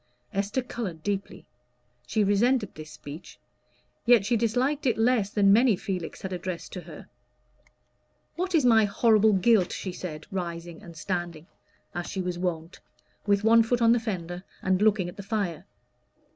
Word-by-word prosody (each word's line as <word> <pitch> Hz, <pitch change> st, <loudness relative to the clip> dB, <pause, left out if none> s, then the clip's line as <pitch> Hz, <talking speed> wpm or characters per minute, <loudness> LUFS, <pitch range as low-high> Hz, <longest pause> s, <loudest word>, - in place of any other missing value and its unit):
Esther 200 Hz, +6 st, -1 dB
colored 195 Hz, -10 st, -6 dB
deeply: 200 Hz, -1 st, -4 dB, 0.6 s
she 215 Hz, -1 st, +1 dB
resented 210 Hz, +2 st, +2 dB
this 155 Hz, 0 st, -10 dB
speech, 155 Hz, +3 st, -10 dB, 0.7 s
yet 235 Hz, -4 st, +5 dB
she 235 Hz, -, +2 dB
disliked 250 Hz, +6 st, 0 dB
it 240 Hz, -, +2 dB
less 225 Hz, -3 st, +2 dB
than 200 Hz, -2 st, +4 dB
many 235 Hz, 0 st, +5 dB
Felix 185 Hz, -3 st, -5 dB
had 190 Hz, -1 st, -4 dB
addressed 180 Hz, -1 st, -5 dB
to 180 Hz, -, -5 dB
her. 165 Hz, -2 st, -12 dB, 1.3 s
"What 365 Hz, +1 st, -1 dB
is 300 Hz, -5 st, +3 dB
my 225 Hz, -3 st, +6 dB
horrible 215 Hz, +1 st, +4 dB
guilt?" 195 Hz, -1 st, +3 dB
she 185 Hz, -, -4 dB
said, 155 Hz, -4 st, -7 dB
rising 170 Hz, -2 st, -5 dB
and 170 Hz, -5 st, -12 dB
standing, 175 Hz, -2 st, -4 dB, 0.5 s
as 175 Hz, 0 st, -4 dB
she 190 Hz, -, -5 dB
was 180 Hz, -1 st, -3 dB
wont, 170 Hz, -2 st, -3 dB, 0.5 s
with 200 Hz, 0 st, +2 dB
one 230 Hz, +1 st, +6 dB
foot 235 Hz, +2 st, +1 dB
on 230 Hz, -1 st, +5 dB
the 240 Hz, -, +4 dB
fender, 180 Hz, -5 st, -5 dB, 0.2 s
and 185 Hz, +1 st, +1 dB
looking 210 Hz, -4 st, +3 dB
at 175 Hz, -, -9 dB
the -, -, -5 dB
fire. 195 Hz, -4 st, -3 dB
200 Hz, 160 wpm, -27 LUFS, 175-225 Hz, 1.3 s, my